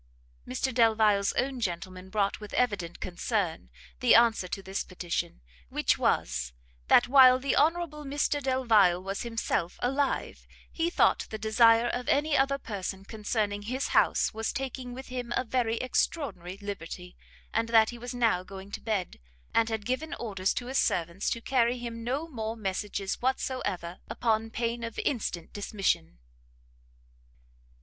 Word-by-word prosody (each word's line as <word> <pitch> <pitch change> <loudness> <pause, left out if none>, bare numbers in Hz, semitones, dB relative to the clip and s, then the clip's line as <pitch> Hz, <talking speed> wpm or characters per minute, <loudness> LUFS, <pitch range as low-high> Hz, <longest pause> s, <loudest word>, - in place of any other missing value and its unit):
Mr 255 - -1
Delvile's 220 -4 +4
own 265 0 -1
gentleman 185 -2 -4
brought, 200 0 0
with 210 -1 -8
evident 205 -9 0
concern, 180 - -2 0.3
the - - +5
answer 230 -5 +4
to 195 +2 -5
this 190 +1 -3
petition; 175 - -4 0.3
which - - +2
was, - - 0 0.3
that 245 - +6
while 255 -1 +8
the 265 +1 0
Honourable 310 0 +1
Mr 290 +1 0
Delvile 230 -9 +4
was 195 +1 -3
himself 225 -7 -2
alive, 270 +3 -1 0.2
he 330 0 0
thought - - +2
the 220 - -4
desire 230 +2 +5
of 245 +1 -3
any 290 +1 +2
other 275 +1 +3
person 195 -5 -5
concerning 210 -1 -2
his 255 +6 -3
house, - - +3
was 225 0 -2
taking 260 -2 -5
with 265 +1 -9
him 250 -2 -5
a - - +1
very 230 -2 0
extraordinary 240 - -2
liberty; 180 -3 -7 0.4
and 230 +1 0
that 225 -1 +5
he 240 - -9
was 245 +1 -6
now 230 -7 +2
going 190 +1 -10
to - - -6
bed, 210 -5 -2 0.3
and 230 0 +3
had 220 -2 -3
given 260 +7 -2
orders 195 -5 -1
to 245 - -3
his 260 +2 0
servants 170 +3 0
to 230 - -2
carry 245 -1 +2
him 230 -1 -6
no 270 +7 -2
more 225 -6 -4
messages 195 -1 -3
whatsoever, 220 -9 -2
upon 225 -1 0
pain 235 +1 -2
of 230 -1 -5
instant 195 - -2
dismission. 195 - -1
225 Hz, 150 wpm, -29 LUFS, 195-255 Hz, 0.4 s, while